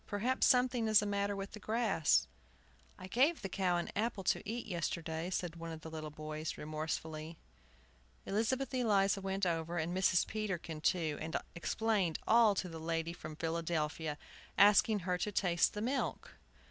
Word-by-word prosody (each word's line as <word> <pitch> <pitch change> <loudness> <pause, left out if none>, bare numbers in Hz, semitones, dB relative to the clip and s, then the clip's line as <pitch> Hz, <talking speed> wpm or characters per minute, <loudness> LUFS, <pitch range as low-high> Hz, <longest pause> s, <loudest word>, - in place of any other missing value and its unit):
"Perhaps 235 +6 +1
something 250 -2 +3
is 215 -1 +6
the - - -2
matter 200 0 0
with 195 0 -5
the 215 - -9
grass." 215 - +2 0.7
"I - - -9
gave 270 - +2
the - - -1
cow 185 -2 +1
an 175 - -3
apple 210 -1 -1
to 185 - +1
eat 235 +2 -3
yesterday," 170 -1 -3
said 175 -2 -3
one 165 0 -6
of 160 -1 -7
the 160 - -8
little 155 -1 -5
boys, 155 +1 -5
remorsefully. 155 +1 -4 0.9
Elizabeth 250 +7 0
Eliza 205 -5 +2
went 195 0 -1
over, 170 0 -1
and 165 +2 -1
Mrs. 185 -1 +3
Peterkin 185 -7 -4
too, 160 -3 +1
and 160 +1 -2 0.2
explained 190 -1 0
all 225 -2 +6
to 185 - -2
the 165 -2 -7
lady 165 +1 -2
from 155 -3 -8
Philadelphia, 160 -1 -2 0.4
asking 205 +1 +6
her 180 0 -1
to 210 - -1
taste 180 -3 +2
the 210 - -3
milk. 260 +3 -2
180 Hz, 165 wpm, -34 LUFS, 160-210 Hz, 0.9 s, is